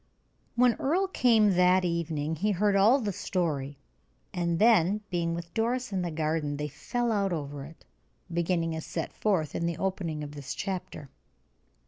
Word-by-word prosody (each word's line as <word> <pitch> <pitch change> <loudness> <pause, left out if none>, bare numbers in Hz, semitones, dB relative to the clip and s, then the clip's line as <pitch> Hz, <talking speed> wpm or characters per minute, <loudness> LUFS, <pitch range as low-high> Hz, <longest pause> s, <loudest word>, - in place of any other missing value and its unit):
When 245 0 +5
Earle 355 +8 +1
came 225 - +4
that 180 0 +4
evening 160 -2 -2
he 205 +7 0
heard 205 +1 +2
all 215 +8 +5
the 210 -5 -2
story, 145 -7 -2 0.6
and 170 -2 0
then, 210 -1 +4
being 170 -1 0
with 170 0 -7
Doris 240 0 -1
in 190 - 0
the 175 - -2
garden, 155 -2 -1
they 150 0 -3
fell 240 - -2
out 200 -3 +1
over 145 -4 -4
it, 160 +2 -15 0.5
beginning 170 -1 0
as 160 - -5
set 165 - -4
forth 175 -9 0
in 170 - -1
the 170 -2 -2
opening 175 -5 -2
of 145 - -7
this 145 -3 -6
chapter. 185 -8 -5
175 Hz, 165 wpm, -28 LUFS, 160-205 Hz, 0.6 s, When